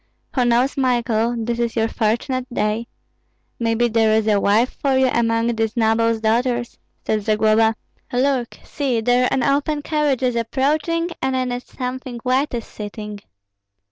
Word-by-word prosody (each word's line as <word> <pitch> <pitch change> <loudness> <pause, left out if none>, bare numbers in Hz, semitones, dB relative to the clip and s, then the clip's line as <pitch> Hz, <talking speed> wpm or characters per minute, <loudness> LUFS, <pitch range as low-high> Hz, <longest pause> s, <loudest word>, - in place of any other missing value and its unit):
"Who 250 -3 +2
knows, 240 +4 +2
Michael, 240 -3 +1
this 235 +1 -2
is 235 -1 -1
your 225 -1 +2
fortunate 245 +3 -1
day? 215 +1 -1 0.7
Maybe 230 +1 +1
there 220 -1 +3
is 220 -1 +2
a 205 -2 +3
wife 220 +5 +2
for 270 -2 +2
you 265 - +4
among 230 -1 +1
these 225 +1 -2
nobles' 225 0 +2
daughters," 240 +2 0 0.3
said 215 -1 0
Zagloba. 220 +1 +3 0.4
"Look! 255 -1 0
see, 265 -6 -1
there 245 +2 +3
an 265 - 0
open 290 +1 0
carriage 295 -5 0
is 250 -2 +1
approaching, 295 +8 0
and 265 0 0
in 255 -1 -1
it 245 0 -5
something 255 -1 -5
white 260 +1 +1
is 235 - -4
sitting." 210 0 -7
240 Hz, 155 wpm, -21 LUFS, 225-260 Hz, 0.7 s, you